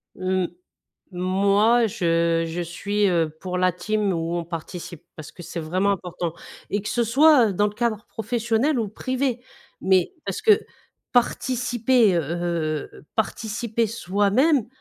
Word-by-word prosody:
Mmh. 185 0 0 0.7
Moi 200 +6 +3
je 165 -3 +1
je 165 +2 -3
suis, 200 +4 -1
heu, 165 -3 +1
pour 180 +1 -4
la 185 0 +3
team 210 +2 -1
où 165 0 -2
on 170 - -2
participe, 170 0 -7
parce 155 - -9
que 175 - -12
c'est 170 - -6
vraiment 185 +5 0
important 180 -3 -3 0.4
et 205 - 0
que 210 - -5
ce 240 - +1
soit, 265 +1 +5
heu, - - -3
dans 205 +3 +2
le 205 - -6
cadre 220 -2 -2
professionnel 235 +4 0
ou 220 - -1
privé, 255 +3 -2 0.4
mais, 190 - +2
parce - - -3
que 430 -2 +5 0.5
participer, 245 -3 +2
heu, 170 - +2 0.7
heu, - - -15
participer 220 +1 -1
soi-même, 215 - +2
205 Hz, 145 wpm, -23 LUFS, 180-235 Hz, 0.7 s, soit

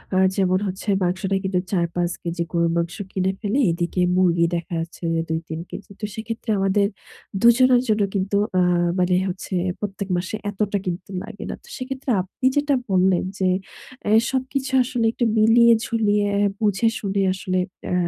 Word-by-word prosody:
আ - - +3 0.2
যেমন 185 -1 +2
হচ্ছে 190 +3 -6 0.2
মাংসটা 190 +2 0
কিন্তু 190 -1 0
৪-৫ 175 -1 0
কেজি 170 0 -2
গরুর 170 -1 +1
মাংস 170 +1 -1 0.2
কিনে 190 0 0
ফেলি 215 +5 0
এদিকে 170 +2 -1
মুরগি 175 -2 +3
দেখা 170 0 -4
যাচ্ছে 165 +1 -7 0.3
২-৩ 160 0 -3
কেজি। 205 - -9
তো 210 - -3
সেক্ষেত্রে 225 +1 -6
আমাদের 195 +1 +2 0.5
দুজনের 245 +1 +6
জন্য 215 -1 +2
কিন্তু 195 +1 0 0.2
আ - - +4 0.4
মানে 180 0 +3
হচ্ছে 185 +1 -6 0.3
প্রত্যেক 200 -1 -4
মাসে 185 +4 -3
এতটা 205 0 -1
কিন্তু 180 +1 -4
লাগে 220 -2 -9
না। - - -3
তো - - -19
সেক্ষেত্রে 265 +1 -5
আপনি 185 +7 -7
যেটা 290 -1 +2
বললেন 185 -1 +3 0.2
যে, 190 - +2 0.6
অ্যা 205 - -1 0.2
সবকিছু 265 0 -2
আসলে 240 -2 -1
একটু 240 - -1
মিলিয়ে 235 +2 +6
ঝুলিয়ে 210 -3 +1 0.3
বুঝে 210 +1 +2
শুনে 200 -1 -1
আসলে 185 0 -2 0.3
আ - - 0
195 Hz, 160 wpm, -22 LUFS, 180-225 Hz, 0.6 s, দুজনের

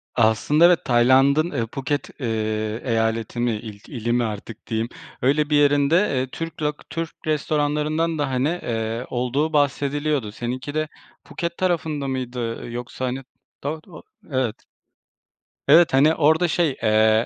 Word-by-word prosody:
Aslında 115 +8 +4
evet, 175 -1 +4
Tayland'ın, 135 +6 +4
ııı, 115 -7 -1
Phuket, 135 +4 -3
ııı, 110 -1 -2
eyaleti 115 -1 -1
mi, 120 0 +2
il 105 -1 -6
ili 120 -3 -3
mi 120 0 +2
artık 110 0 -6
diyeyim, 115 +1 -1 0.3
öyle 145 +4 +2
bir 150 - +3
yerinde, 145 +1 +4 0.2
ııı, 130 +1 0
Türk 165 +4 -6
lok 150 0 -3
Türk 165 -1 -3 0.2
restoranlarından 155 +1 0
da, 145 -2 0
hani, 135 +7 0
ııı, 115 +1 -2
olduğu 130 +6 -1
bahsediliyordu. 145 -3 0
Seninki 125 +5 -5
de 155 0 0 0.4
Phuket 170 0 -4
tarafında 160 -6 -1
mıydı? 125 -3 -4
Yoksa, 125 +2 -5
hani, 130 +2 -3 0.4
do 155 +3 -3
do 165 -4 -12 0.3
Evet. 130 -4 -1 1.0
Evet. 160 +1 +6
Hani, 150 +4 +5
orada 160 +3 +3
şey, 160 -4 +1
eee, 110 +1 +4
135 Hz, 145 wpm, -23 LUFS, 115-150 Hz, 1.0 s, Evet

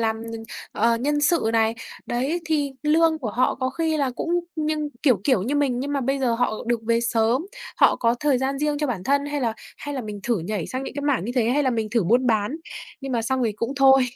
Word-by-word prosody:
làm, 220 0 0 0.5
ờ, 230 +2 +2
nhân 290 +5 0
sự 290 -6 +2
này, 225 0 +2 0.3
đấy 270 +8 -1
thì 295 -3 0
lương 320 +1 +3
của 240 -7 -3
họ 250 +5 +1
có 260 0 -2
khi 320 +3 0
là 280 -3 +1
cũng 290 +6 -4 0.3
nhưng 305 -1 -1
kiểu, 250 - +4
kiểu, 255 -9 +3
như 255 +8 -1
mình, 275 -4 +1
nhưng 285 +2 -3
mà 280 - 0
bây 270 +2 0
giờ 250 -3 +1
họ 245 0 +1
được 240 -1 +1
về 230 0 +3
sớm, 235 +6 +1 0.3
họ - - +5
có 230 -1 +2
thời 290 -4 +2
gian 270 +1 -1
riêng 295 0 0
cho 300 - 0
bản 210 -9 -3
thân 280 +1 +2
hay 290 0 -2
là 230 -3 0 0.2
hay 290 0 -6
là 265 - -2
mình 210 -2 -6
thử 235 0 0
nhảy 180 +1 -3
sang 260 +1 -4
những - - -7
cái 285 - -4
mảng 280 -10 +1
như 240 - -3
thế 235 -3 +2
hay 290 +3 +2
là 260 - +2
mình 225 -3 -1
thử 230 -4 +1
buôn 240 +8 +3
bán, 220 +4 +1 0.4
nhưng 270 -1 -5
mà 230 - 0
xong 260 +3 0
thì 220 - 0
cũng 230 +5 -3
thôi. 270 -1 +6
255 Hz, 255 wpm, -24 LUFS, 230-290 Hz, 0.5 s, thôi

